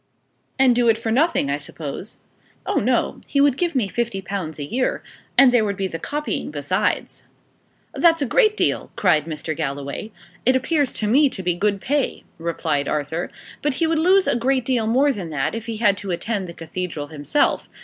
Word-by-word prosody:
"And 260 -2 +5
do 240 -1 +3
it 220 - +4
for 225 0 -3
nothing, 270 - +2
I 140 - 0
suppose?" 150 +6 -7 0.5
"Oh - - 0
no. - - +1
He 280 - 0
would 280 -2 +5
give 340 +1 -1
me 240 -6 +2
fifty 235 -1 -2
pounds 190 -5 -5
a 145 - -4
year. 250 - -1 0.3
And 270 -2 +8
there 240 -3 +4
would 200 -2 -1
be 195 0 -2
the 165 -3 -4
copying 295 - -3
besides." - - -1 0.7
"That's 330 -1 +4
a 285 - +1
great 430 - +3
deal!" - - +1
cried 160 -6 +3
Mr. 160 0 -4
Galloway. 140 +6 -4 0.3
"It 255 +2 +4
appears 280 +1 +1
to 210 - -2
me 275 +6 +5
to 190 - -6
be 180 0 +1
good 200 +3 0
pay," 285 +5 -1 0.2
replied 155 -4 -1
Arthur. 150 +3 -2 0.3
"But 295 -2 0
he 330 - +1
would 320 0 +1
lose 370 +3 +4
a - - +1
great 255 +1 +1
deal 240 -4 +1
more 265 +6 +3
than 185 -8 -6
that, 150 -3 -1
if 230 0 -5
he 225 -1 -3
had 205 -3 +3
to 200 - -7
attend 195 +2 -2
the - - -7
cathedral 165 -3 -5
himself. 155 - 0
220 Hz, 200 wpm, -22 LUFS, 170-270 Hz, 0.7 s, And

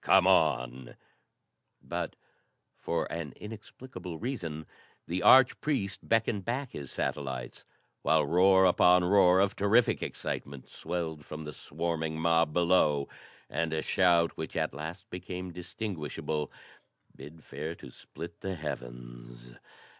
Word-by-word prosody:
"Come - - +5
on 60 0 +2 0.5
" - - -52 0.2
But, - - -4 0.6
for 85 - -2
an 85 -3 -5
inexplicable 105 -4 -9
reason, 85 - -4 0.4
the 90 +2 -2
arch 130 +4 +6
priest 105 -11 -1
beckoned 115 -3 +2
back 125 +5 -3
his 70 -2 -7
satellites, 65 -4 -4 0.4
while 80 -2 +3
roar 95 +4 +5
upon 90 0 +5
roar 90 0 +5
of 100 +1 +2
terrific 110 +4 +3
excitement 70 -1 -5
swelled 80 -3 -4
from 75 +2 -7
the 75 -1 -7
swarming 80 0 -3
mob 80 -1 +3
below, 85 -4 +3 0.4
and 80 +2 -2
a 80 - -1
shout 85 -3 +3
which - - -5
at - - 0
last 80 +7 -7
became 90 0 -6
distinguishable 80 -5 -4 0.6
bid 80 +2 -12
fair 75 +4 -6
to - - -12
split 85 0 -10
the 95 -1 -3
heavens. - - -8
85 Hz, 125 wpm, -30 LUFS, 75-95 Hz, 0.6 s, arch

